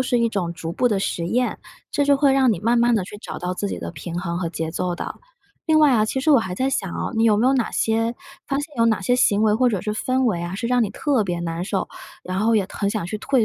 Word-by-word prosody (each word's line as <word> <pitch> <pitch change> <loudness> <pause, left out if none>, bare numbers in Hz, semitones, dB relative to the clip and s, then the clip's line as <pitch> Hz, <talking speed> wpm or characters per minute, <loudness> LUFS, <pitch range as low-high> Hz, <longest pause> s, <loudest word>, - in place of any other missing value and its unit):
是 255 -1 +1
一 235 - +3
种 190 -6 -2
逐 165 0 -5
步 245 - +2
的 205 -4 +1
实 170 -3 -2
验， 245 +7 0 0.3
这 285 - +1
就 285 -1 +5
会 275 -1 +3
让 265 -2 +4
你 205 - 0
慢 235 +4 +2
慢 240 0 +4
地 195 -4 0
去 205 +2 -10
找 - - -7
到 180 +1 -3
自 200 +2 -3
己 - - -4
的 - - -5
平 170 +3 -6
衡 170 -1 -3
和 170 -2 -2
节 160 -1 -4
奏 180 +1 -2
的。 - - -5 0.5
另 315 -1 +4
外 295 -3 +5
啊， 215 -3 +3
其 265 - -2
实 310 - +2
我 280 - +7
还 185 -5 -4
在 260 +6 0
想 195 -8 -2
哦， - - -3
你 225 - +1
有 215 -2 +4
没 235 +4 +2
有 265 - +4
哪 255 -4 0
些 225 +1 0 0.3
发 275 - 0
现 295 0 -6
有 230 - +4
哪 220 -3 +2
些 245 +6 +2
行 210 -4 +3
为 215 - +4
或 250 +2 +3
者 200 -6 -1
是 210 -1 -2
氛 255 +4 0
围 180 -8 0
啊， 175 +2 -4
是 235 +4 -3
让 245 -1 +2
你 215 - 0
特 275 -7 0
别 175 -3 -2
难 170 0 -3
受， 195 0 -2 0.4
然 185 +1 -4
后 225 +1 +3
也 195 -3 +1
很 200 - -2
想 205 -3 -2
去 210 +4 -4
退 255 0 +2
220 Hz, 315 characters per minute, -22 LUFS, 185-250 Hz, 0.5 s, 我